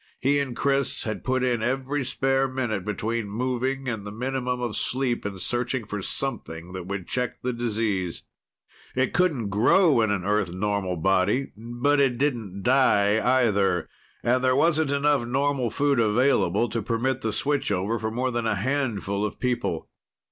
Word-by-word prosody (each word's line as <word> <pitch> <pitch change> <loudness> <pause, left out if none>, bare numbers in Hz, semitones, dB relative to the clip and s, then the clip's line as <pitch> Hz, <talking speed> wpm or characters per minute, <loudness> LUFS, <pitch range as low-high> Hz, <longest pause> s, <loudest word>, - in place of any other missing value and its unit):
He 140 +2 +2
and 135 -4 -3
Chris 140 -1 0
had 110 -1 -4
put 130 0 0
in 120 -3 +1
every 135 +4 -1
spare 135 +1 +1
minute 120 -7 -2
between 105 +2 -2
moving 130 +4 -2
and 110 -5 -3
the 105 - -7
minimum 125 +2 -2
of 120 -3 -2
sleep 125 -4 -1
in 100 -1 -6
searching 120 +4 -2
for 105 0 -4
something 90 -10 -4
that 90 -1 -6
would 95 -2 -4
check 125 -1 -3
the 125 0 -1
disease. 110 -6 -2 0.7
It 130 0 +1
couldn't 150 - +1
grow 120 - +4
in 110 - +2
an 100 -3 -1
Earth 105 -3 +1
normal 95 -1 -1
body, 95 +9 +1
but 120 +6 0
it 135 -3 +2
didn't 115 -9 -2
die, 110 -5 +4 0.2
either. 95 -5 +1 0.4
And 125 +2 +2
there 130 0 +3
wasn't 160 0 +3
enough 140 -2 +2
normal 135 -1 0
food 140 +1 +1
available 115 -2 +3
to 115 +1 -2
permit 120 +4 -1
the 110 - -1
switch 145 +2 0
over 100 +5 0
for 110 +1 -2
more 125 +3 -1
than 120 -1 -1
a 110 - +1
handful 105 -4 -1
of 105 - -3
people. 120 -10 -1
120 Hz, 170 wpm, -25 LUFS, 105-130 Hz, 0.7 s, grow